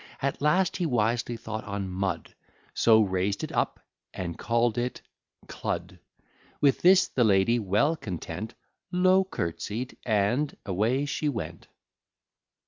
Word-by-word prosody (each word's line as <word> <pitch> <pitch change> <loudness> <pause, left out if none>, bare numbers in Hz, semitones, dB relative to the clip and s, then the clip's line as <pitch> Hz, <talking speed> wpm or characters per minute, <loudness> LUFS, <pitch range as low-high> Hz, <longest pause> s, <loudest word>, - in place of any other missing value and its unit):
At 140 0 -2
last 175 +5 +2
he 180 - 0
wisely 120 -1 0
thought 110 -1 -5
on 100 -1 -3
mud; 95 -2 -3 0.4
So 110 -1 +5
raised 95 +1 -1
it - - -4
up, - - -1 0.4
and 85 -2 -4
call'd 120 0 +1
it 125 +1 -3 0.4
Cludd. 90 +1 -4 0.6
With 140 -2 +3
this, 185 +1 +6
the 125 - +1
lady 105 +3 +4
well 105 - +2
content, 100 - -6 0.4
Low 185 +1 +4
curtsey'd, 110 - -4
and 115 +7 +1
away 110 +9 +1
she 145 +1 -1
went. 85 - -5
115 Hz, 130 wpm, -27 LUFS, 95-140 Hz, 0.6 s, this